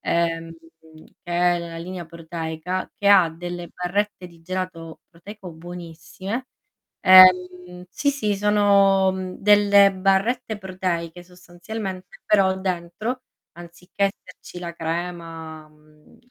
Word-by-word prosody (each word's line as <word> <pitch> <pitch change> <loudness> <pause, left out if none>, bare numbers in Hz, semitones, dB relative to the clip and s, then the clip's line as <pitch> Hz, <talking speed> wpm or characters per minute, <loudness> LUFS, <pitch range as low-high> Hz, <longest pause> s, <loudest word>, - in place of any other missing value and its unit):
ehm, 165 -1 -1 0.7
che 175 - -7 0.2
è - - -3
la 170 -1 -7
linea 180 +1 -7
proteica, 165 +2 -5
che 200 - +1
ha 190 -4 +6
delle 175 +1 -7
barrette 180 +2 -3
di 170 -1 -18
gelato 180 -2 -6
proteico 190 +2 -11
buonissime. 175 +7 -7 0.6
Ehm, 180 -1 +6
sì, 285 +10 0
sì, 215 -7 -1
sono, 200 -2 +3
mhmm, 185 -1 -6
delle 205 -1 +5
barrette 200 +5 0
proteiche 180 -3 -4
sostanzialmente, 185 +2 -8
però 190 -2 +3
dentro 190 +7 -4 0.3
anziché 175 +3 -7 0.2
esserci 175 - -12
la 170 -1 -6
crema, 165 -2 -6
mhmm, 150 0 -24
180 Hz, 110 wpm, -23 LUFS, 170-195 Hz, 0.7 s, ha